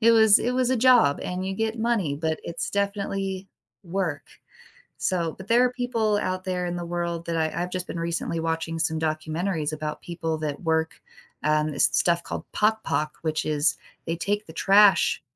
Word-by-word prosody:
it 230 0 +6
was 220 -2 +7
it 245 +2 -1
was 255 0 +1
a 260 - +2
job, 240 - +5
and 185 +1 -3
you 190 - -2
get 225 +2 -2
money, 220 -11 0
but 160 +1 -2
it's 170 0 -4
definitely 195 -1 -2 0.4
work, 175 -4 -2 0.8
so 170 -3 -1
But 190 - -10
there 240 +3 +5
are 250 - +2
people 230 -4 0
out 185 -2 -2
there 180 -1 -2
in 175 - -3
the 175 -1 -4
world 170 -1 -3
that 165 -1 -2
I 160 +2 0
I've 180 - -5
just 185 -1 -3
been 170 - -5
recently 170 0 -2
watching 165 0 -2
some 160 0 0
documentaries 155 +1 -2
about 155 0 -4
people 165 -2 -3
that 150 -2 -4
work, 160 -1 -1 0.4
um, 155 0 +2
it's 140 -2 +2
stuff 170 0 +2
called - - -6
Pagpag, 210 -8 +1
which 155 -1 -1
is, 150 +1 +1 0.3
they 165 0 -1
take 205 +3 -1
the 160 - -11
trash 200 +3 +5
175 Hz, 190 wpm, -25 LUFS, 160-205 Hz, 0.8 s, was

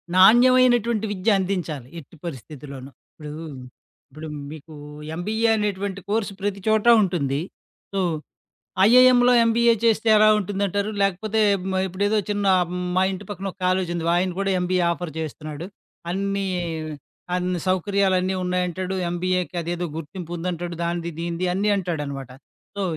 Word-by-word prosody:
నాణ్యమైనటువంటి 240 +1 +5
విద్య 205 +3 +1
అందించాలి. 175 -9 -3
ఎట్టి 160 - -15
పరిస్థితిలోను. 140 -2 -8 0.2
ఇప్పుడు, 150 -2 -9 0.8
ఇప్పుడు 155 +3 -9 0.2
మీకు 155 +1 -11 0.4
ఎంబీఏ 220 +6 0
అనేటువంటి 200 -1 -2
కోర్స్ 215 -1 0
ప్రతి 200 -1 -2
చోటా 220 +2 +5
ఉంటుంది. 145 -6 -1 0.5
సో 195 - 0 0.9
ఐఏఎంలో 250 0 +6
ఎంబీఏ 235 +1 +4
చేస్తే 225 0 +2
ఎలా 215 0 +6
ఉంటుందంటారు? 200 +1 -1
లేకపోతే 200 +3 0 0.2
హ్మ్. 190 0 -2
ఇప్పుడేదో 205 +4 0
చిన్న 205 -1 -1 0.5
మా 185 - +3
ఇంటి 195 +2 -7
పక్కన 195 -1 -5
ఒక - - -26
కాలేజుంది, 175 -2 0
ఆయన 185 0 +1
కూడా 195 0 0
ఎంబీఏ 180 0 +1
ఆఫర్ 170 -1 -4
చేస్తున్నాడు. 155 +2 -6 0.5
అన్ని, 195 +1 -1 0.9
అన్ని 180 -1 -1
సౌకర్యాలన్నీ 190 0 +1
ఉన్నాయంటాడు. 180 +1 -2
ఎంబీఏకి 180 +1 -1
అదేదో 175 +1 -3
గుర్తింపు 170 +2 -7
ఉందంటాడు 175 0 -4
దానిది, 170 0 -2
దీనిది 170 +1 -2
అన్నీ 205 +3 +1
అంటాడనమాట. 145 -8 -4 0.5
సో, 200 - -1
185 Hz, 125 wpm, -23 LUFS, 170-205 Hz, 0.9 s, ఐఏఎంలో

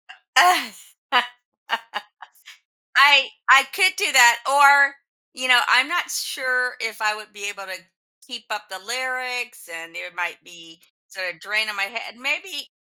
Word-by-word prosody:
I 360 -1 +2 2.2
I 275 0 +6
could 375 -1 +3
do 400 -6 0
that. 240 -3 +6
Or, 280 0 +5 0.4
you 255 0 -5
know, 245 -1 +6
I'm 260 +3 +4
not 350 +1 -3
sure 250 -2 -3
if 225 -1 -6
I 215 0 -1
would 215 0 -14
be 205 0 -7
able 200 -1 -10
to 185 -1 -10 0.5
keep 240 -4 -11
up 210 -1 -6
the 190 0 -10
lyrics, 250 0 -6
and 165 0 -11
it 180 0 -10
might 175 -1 -5
be 165 -1 -19 0.3
sort 185 -2 -7
of 165 - -24
draining 215 +2 -2
my 195 - -2
head, 230 +3 -8
maybe 290 +2 -5
245 Hz, 145 wpm, -20 LUFS, 205-275 Hz, 2.2 s, I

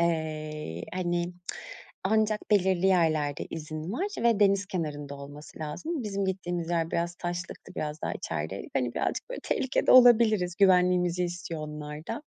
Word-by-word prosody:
eee, 170 - +4
y 155 - -3
hani, 175 -1 -1 0.7
ancak 215 +1 +2
belirli 190 -2 +3
yerlerde 155 -6 +2
izin 155 +1 -5
var 285 - -1 0.2
ve 230 -3 +4
deniz 200 -1 +4
kenarında 150 -6 -4
olması 145 +3 -11
lazım. 245 - -4
Bizim 200 -1 -1
gittiğimiz 175 -3 -2
yer 165 -1 0
biraz 170 0 -1
taşlıktı, 175 +1 -6
biraz 150 0 -4
daha - - -2
içerideydik. 80 +4 -4
Hani, 125 -2 0
birazcık - - -2
böyle - - -5
tehlikede 260 - +1
olabiliriz, 220 -8 +6
güvenliğimizi 180 -2 +4
istiyor 175 -2 -4
onlar 150 0 -7
da. 230 - -3
175 Hz, 145 wpm, -28 LUFS, 155-195 Hz, 0.7 s, olabiliriz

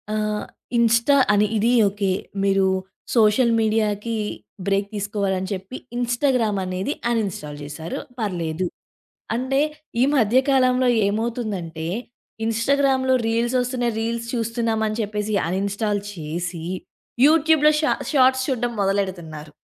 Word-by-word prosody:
ఆహ్, 210 0 -1 0.3
ఇన్‌స్టా 235 +4 +4 0.2
అని 205 +1 +3
ఇది 225 +3 +2 0.2
ఓకే. 200 -1 -1 0.3
మీరు 195 -1 +3 0.5
సోషల్ 230 +2 +4
మీడియాకి 220 0 0 0.5
బ్రేక్ 200 0 +1
తీసుకోవాలని 200 -2 -1
చెప్పి 195 +7 -6 0.2
ఇన్‌స్టాగ్రామ్‌ 240 -3 +1
అనేది 185 +9 -2 0.2
అన్‌ఇన్‌స్టాల్ 195 -10 -2
చేశారు. 150 +3 -6 0.2
పర్లేదు. 180 -4 -2 0.7
అంటే 260 +3 +1 0.4
ఈ - - +6
మధ్య 235 -2 +3
కాలంలో 255 -1 +3 0.2
ఏమవుతుందంటే, 205 -7 -3 0.6
ఇన్‌స్టాగ్రామ్‌లో 260 +3 +2
రీల్స్ 235 +2 0
వస్తున్నాయి 245 -2 -1
రీల్స్ 230 +1 -2
చూస్తున్నామని 225 -1 -1
చెప్పేసి 210 0 -2
అన్‌ఇన్‌స్టాల్ 200 +3 -1
చేసి, 170 0 -5 0.6
యూట్యూబ్‌లో 310 -1 +4
షా 300 - +2 0.2
షార్ట్స్ 260 -1 +4
చూడడం 245 -2 -1
మొదలెడుతున్నారు. 180 -6 -2
215 Hz, 105 wpm, -22 LUFS, 195-245 Hz, 0.7 s, ఈ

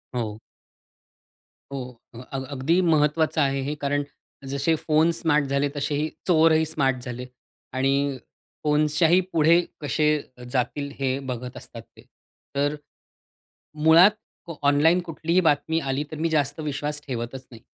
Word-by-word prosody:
हो. 110 -3 -3 1.3
हो, 140 - -3 0.4
अ, - - -8
अग् 135 -1 -4
अगदी 150 +7 +2
महत्त्वाचं 155 -1 +2
आहे 135 -1 +1
हे 145 +3 -3
कारण 145 0 0 0.5
जसे 140 +4 +1
फोन 160 +2 +3
स्मार्ट 150 -4 +2
झाले 140 +1 0
तसे 145 +1 -1
हे 150 +2 0 0.2
चोरही 160 -2 +4
स्मार्ट 135 -4 0
झाले 125 0 -6 0.5
आणि 135 +1 +1 0.7
फोन्सच्याही 155 +3 +3
पुढे 165 +2 +5 0.2
कसे 150 +1 +1 0.5
जातील 140 +3 -1
हे 135 -1 0
बघत 125 0 -6
असतात - - -10
ते. - - -20 0.5
तर 145 +1 +1 1.1
मुळात 170 +5 +8 0.3
को 165 -3 -8
ऑनलाईन 155 +5 +4
कुठलीही 165 +2 0
बातमी 160 +2 +2
आली 135 -1 -2
तर 155 - -6
मी 165 +2 0
जास्त 145 -2 0
विश्वास 150 0 -3
ठेवतच 125 +1 -5
नाही. 115 -2 -13
145 Hz, 135 wpm, -24 LUFS, 135-160 Hz, 1.3 s, मुळात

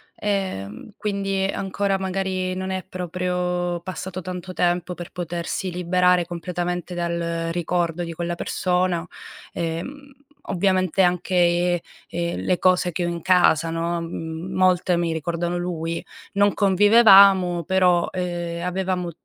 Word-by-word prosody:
ehm, 190 - -3
quindi 195 -2 -1
ancora 195 0 -1
magari 185 -1 -2
non 185 0 -4
è 185 0 -3
proprio 180 -1 -2
passato 185 0 -6
tanto 180 +1 -6
tempo 175 0 0
per 175 - -8
potersi 175 +1 -4
liberare 180 0 +2
completamente 175 +1 -4
dal 170 -1 -2
ricordo 175 0 -1
di 170 - -5
quella 170 +1 -3
persona. 180 -1 0 0.5
Ehm, 260 - -5 0.3
ovviamente 185 -1 +1
anche, 175 -1 +2 0.3
ehm, 170 0 -3
le 180 - 0
cose 180 -1 +3
che 175 +1 -2
ho - - -1
in 170 -1 -4
casa, 170 -3 +4
no, 170 +1 -2
mhmm, 165 +2 -6
molte 185 -1 +3
mi 170 -1 0
ricordano 170 +2 -2
lui. 170 -2 -3 0.3
Non 200 0 +3
convivevamo, 195 -4 +6
però, 180 -2 +3
ehm, 175 -1 -3
avevamo 180 -1 -2
180 Hz, 125 wpm, -23 LUFS, 170-185 Hz, 0.5 s, convivevamo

